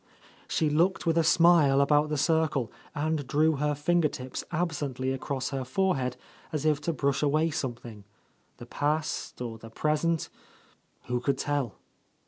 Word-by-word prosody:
She 160 Hz, -, +1 dB
looked 175 Hz, +6 st, +2 dB
with 165 Hz, -1 st, +2 dB
a 165 Hz, -, +3 dB
smile 160 Hz, -4 st, +5 dB
about 150 Hz, +2 st, +3 dB
the 150 Hz, -, -1 dB
circle, 155 Hz, -5 st, +1 dB, 0.2 s
and 150 Hz, -2 st, -1 dB
drew 155 Hz, +1 st, +2 dB
her 150 Hz, +1 st, 0 dB
finger 165 Hz, +3 st, +2 dB
tips 130 Hz, -2 st, -6 dB
absently 145 Hz, -6 st, -2 dB
across 135 Hz, 0 st, -3 dB
her 135 Hz, -1 st, -2 dB
forehead 130 Hz, -4 st, 0 dB, 0.3 s
as 155 Hz, -1 st, -2 dB
if 150 Hz, -1 st, +2 dB
to 170 Hz, -, -1 dB
brush 140 Hz, -3 st, 0 dB
away 155 Hz, +2 st, +2 dB
something, 120 Hz, -6 st, -5 dB, 0.3 s
— -, -, -40 dB
the 120 Hz, -, -10 dB
past, 150 Hz, +5 st, -2 dB
or 115 Hz, -2 st, -6 dB
the 115 Hz, -, -11 dB
present, 155 Hz, +6 st, 0 dB, 0.7 s
who 125 Hz, 0 st, -2 dB
could 135 Hz, +2 st, 0 dB
tell? 140 Hz, -9 st, -1 dB
145 Hz, 155 wpm, -28 LUFS, 130-160 Hz, 0.7 s, smile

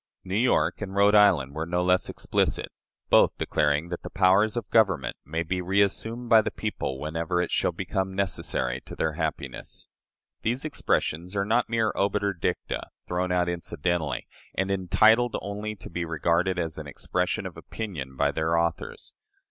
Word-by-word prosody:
" -, -, -62 dB
New 95 Hz, -, -6 dB
York 100 Hz, -7 st, +2 dB
and 100 Hz, -2 st, -5 dB
Rhode 100 Hz, +1 st, +5 dB
Island 95 Hz, -10 st, +5 dB
were 80 Hz, +2 st, -3 dB
no 90 Hz, +1 st, 0 dB
less 90 Hz, 0 st, +2 dB
explicit, -, -, -1 dB, 0.4 s
both -, -, +5 dB
declaring 75 Hz, +2 st, +1 dB
that 90 Hz, -, -4 dB
"the -, -, -7 dB
powers 100 Hz, +4 st, +3 dB
of 115 Hz, -, -3 dB
government 95 Hz, -, +3 dB
may 80 Hz, +3 st, -2 dB
be 90 Hz, +2 st, -2 dB
reassumed 100 Hz, +6 st, 0 dB
by 110 Hz, -1 st, +7 dB
the -, -, -2 dB
people 65 Hz, 0 st, -4 dB
whenever 80 Hz, +4 st, -2 dB
it 90 Hz, -, -1 dB
shall -, -, +1 dB
become 95 Hz, 0 st, -3 dB
necessary 65 Hz, -9 st, -1 dB
to -, -, -8 dB
their 80 Hz, -, 0 dB
happiness." 80 Hz, 0 st, -5 dB, 0.5 s
These 125 Hz, +6 st, -1 dB
expressions 90 Hz, -, -1 dB
are 100 Hz, 0 st, +1 dB
not 115 Hz, +3 st, +1 dB
mere 115 Hz, -1 st, +1 dB
obiter 100 Hz, 0 st, +1 dB
dicta, 85 Hz, -, -3 dB, 0.2 s
thrown 90 Hz, +1 st, -1 dB
out 90 Hz, -1 st, +2 dB
incidentally, 85 Hz, -2 st, -2 dB, 0.3 s
and 95 Hz, +1 st, 0 dB
entitled 110 Hz, +5 st, +4 dB
only 105 Hz, +1 st, -5 dB
to -, -, -11 dB
be 85 Hz, +1 st, -3 dB
regarded 85 Hz, +3 st, +1 dB
as 80 Hz, -3 st, -3 dB
an 75 Hz, -, -7 dB
expression 70 Hz, -, -2 dB
of -, -, -6 dB
opinion 75 Hz, -12 st, -6 dB
by 70 Hz, 0 st, +2 dB
their 80 Hz, +3 st, 0 dB
authors. 85 Hz, -, -2 dB
90 Hz, 170 wpm, -26 LUFS, 80-100 Hz, 0.5 s, by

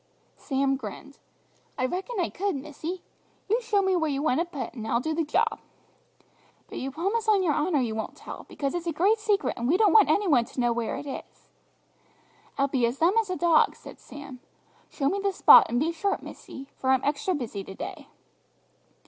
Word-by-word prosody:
Sam 270 Hz, -1 st, 0 dB
grinned. 265 Hz, +4 st, -9 dB, 0.6 s
"I 255 Hz, -, 0 dB
reckon 380 Hz, -, -3 dB
I 350 Hz, -, 0 dB
could, 395 Hz, -2 st, -2 dB
missy. 310 Hz, +6 st, -6 dB, 0.4 s
You 450 Hz, +5 st, +1 dB
show 425 Hz, -4 st, +1 dB
me 380 Hz, -1 st, +2 dB
where 320 Hz, -3 st, +1 dB
you 280 Hz, 0 st, -2 dB
want 310 Hz, -2 st, +2 dB
it 345 Hz, +1 st, -2 dB
put, 285 Hz, -, -5 dB
and 225 Hz, -3 st, -7 dB
I'll 235 Hz, -, +1 dB
do 315 Hz, +5 st, -2 dB
the 330 Hz, +1 st, 0 dB
job!" 305 Hz, -, 0 dB, 1.1 s
"But -, -, -7 dB
you 265 Hz, -, -3 dB
promise 395 Hz, -, -2 dB
on 400 Hz, -3 st, +4 dB
your 320 Hz, -5 st, +2 dB
honour 300 Hz, -1 st, +1 dB
you 230 Hz, -3 st, -1 dB
won't 220 Hz, 0 st, -5 dB
tell, -, -, -10 dB
because 275 Hz, -1 st, -3 dB
it's 350 Hz, -1 st, -4 dB
a -, -, +1 dB
great 390 Hz, +8 st, +2 dB
secret, 420 Hz, -2 st, +1 dB
and 235 Hz, -, -2 dB
we 330 Hz, +7 st, +3 dB
don't 430 Hz, 0 st, +4 dB
want 440 Hz, -, +6 dB
any 405 Hz, -1 st, +2 dB
one 255 Hz, -8 st, +4 dB
to 260 Hz, -, -9 dB
know 240 Hz, -1 st, +2 dB
where 235 Hz, -1 st, -2 dB
it -, -, -7 dB
is." 275 Hz, -, -9 dB, 1.1 s
"I'll 275 Hz, 0 st, +2 dB
be 255 Hz, -3 st, +1 dB
as 240 Hz, +3 st, -4 dB
dumb 335 Hz, +5 st, +3 dB
as 425 Hz, -, -10 dB
a 365 Hz, -, -1 dB
dog," 340 Hz, -3 st, +3 dB
said -, -, -13 dB
Sam. 280 Hz, -3 st, -11 dB, 0.5 s
"Show 275 Hz, -, -2 dB
me 395 Hz, +7 st, 0 dB
the 400 Hz, 0 st, 0 dB
spot, 375 Hz, -, +8 dB
and 240 Hz, -, 0 dB
be 315 Hz, +4 st, +1 dB
sharp, 390 Hz, +4 st, -2 dB
missy, 270 Hz, 0 st, -10 dB
for 260 Hz, -, -2 dB
I'm 265 Hz, -1 st, +3 dB
extra 290 Hz, +6 st, 0 dB
busy 230 Hz, -8 st, -5 dB
to 190 Hz, -, -10 dB
day!" -, -, -7 dB
305 Hz, 215 wpm, -26 LUFS, 265-375 Hz, 1.1 s, spot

